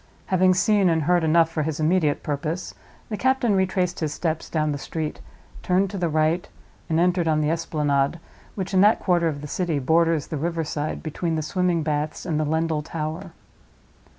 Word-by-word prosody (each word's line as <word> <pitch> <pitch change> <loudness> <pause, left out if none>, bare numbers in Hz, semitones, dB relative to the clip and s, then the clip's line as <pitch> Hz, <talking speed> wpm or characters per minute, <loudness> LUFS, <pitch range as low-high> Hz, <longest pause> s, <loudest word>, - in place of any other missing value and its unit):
Having 185 0 +3
seen 195 0 +3
and 160 -2 +1
heard 175 +2 +2
enough 165 +1 +3
for 160 - -1
his 155 0 -2
immediate 155 -2 +1
purpose, 155 +4 -3 0.4
the 210 - -3
captain 260 -4 +2
retraced 185 -1 0
his 155 -3 -1
steps 160 0 -3
down 155 -2 0
the 145 - -3
street, 155 +1 -4 0.4
turned 185 +1 +1
to 200 - -5
the 175 -2 0
right, 155 +3 +1 0.4
and 160 0 +2
entered 175 -1 +2
on 155 -1 +2
the 150 +1 +1
Esplanade, 150 -2 0 0.4
which, 195 -1 -4
in 185 - +5
that 210 +2 +5
quarter 175 -3 +2
of 145 -3 -3
the 150 - -6
city, 170 0 -1
borders 160 +2 +2
the 155 - -5
river 165 +2 -1
side 150 0 -4
between 165 +1 -2
the 155 - -1
swimming 175 0 0
baths 150 0 -2
and 155 -4 -1
Lendal 160 0 0
Tower. 160 +3 -5
165 Hz, 185 wpm, -24 LUFS, 155-180 Hz, 0.4 s, in